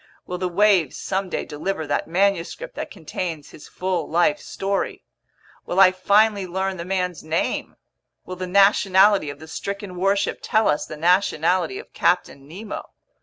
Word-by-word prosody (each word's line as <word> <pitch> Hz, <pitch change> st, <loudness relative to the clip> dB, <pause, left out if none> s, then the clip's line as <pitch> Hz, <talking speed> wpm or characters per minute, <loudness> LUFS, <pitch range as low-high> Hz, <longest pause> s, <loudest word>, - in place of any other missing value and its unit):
Will 180 Hz, 0 st, -5 dB
the 185 Hz, -, -1 dB
waves 190 Hz, -5 st, +3 dB
someday 190 Hz, -1 st, -3 dB
deliver 160 Hz, +2 st, -3 dB
that 145 Hz, -, -1 dB
manuscript 195 Hz, -, 0 dB
that -, -, -5 dB
contains 165 Hz, -4 st, -6 dB
his -, -, -13 dB
full 180 Hz, -3 st, -3 dB
life 185 Hz, +5 st, +2 dB
story? 195 Hz, 0 st, -3 dB, 0.6 s
Will 180 Hz, -, 0 dB
I 190 Hz, -1 st, +8 dB
finally 200 Hz, +1 st, +2 dB
learn 190 Hz, +1 st, -2 dB
the 170 Hz, -, -6 dB
man's 180 Hz, -2 st, -2 dB
name? 160 Hz, +2 st, -2 dB, 0.5 s
Will 185 Hz, -, -6 dB
the 185 Hz, 0 st, -5 dB
nationality 195 Hz, -2 st, +4 dB
of 145 Hz, -, -7 dB
the 160 Hz, +2 st, -12 dB
stricken 200 Hz, +3 st, -6 dB
warship 195 Hz, +2 st, 0 dB
tell 220 Hz, 0 st, +2 dB
us 150 Hz, -, 0 dB
the 155 Hz, -, -8 dB
nationality 180 Hz, -, +2 dB
of 430 Hz, -, -11 dB
Captain 140 Hz, 0 st, 0 dB
Nemo? 200 Hz, +7 st, -7 dB
185 Hz, 155 wpm, -22 LUFS, 170-200 Hz, 0.6 s, I